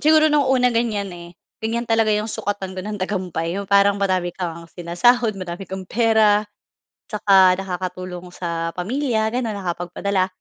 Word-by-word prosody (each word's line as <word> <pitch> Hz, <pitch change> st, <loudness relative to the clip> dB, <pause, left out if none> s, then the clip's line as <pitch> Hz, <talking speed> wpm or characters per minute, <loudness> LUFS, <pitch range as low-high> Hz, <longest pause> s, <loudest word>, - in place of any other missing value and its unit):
siguro 310 Hz, 0 st, +5 dB
nung 285 Hz, -3 st, +3 dB
una 250 Hz, -2 st, +3 dB
ganyan 215 Hz, -5 st, -1 dB
eh. 170 Hz, 0 st, -11 dB, 0.2 s
Ganyan 230 Hz, +2 st, -1 dB
talaga 225 Hz, -1 st, +2 dB
'yong 210 Hz, 0 st, +1 dB
sukatan 200 Hz, -2 st, -3 dB
ko 185 Hz, -, -5 dB
ng 210 Hz, +2 st, -4 dB
tagumpay. 180 Hz, -3 st, -2 dB
Yung 200 Hz, -, -8 dB
parang 200 Hz, 0 st, +4 dB
madami 185 Hz, -3 st, 0 dB
kang 170 Hz, -2 st, -5 dB
sinasahod, 205 Hz, +6 st, +2 dB
madami 180 Hz, 0 st, -6 dB
kang 190 Hz, 0 st, -5 dB
pera 220 Hz, 0 st, +3 dB, 0.6 s
tsaka 195 Hz, -3 st, +5 dB
nakakatulong 185 Hz, -1 st, -5 dB
sa 165 Hz, -1 st, -3 dB
pamilya, 220 Hz, +3 st, -1 dB
gano'n, 235 Hz, -2 st, -2 dB
nakapagpadala. 185 Hz, +1 st, -1 dB
200 Hz, 150 wpm, -21 LUFS, 180-220 Hz, 0.6 s, siguro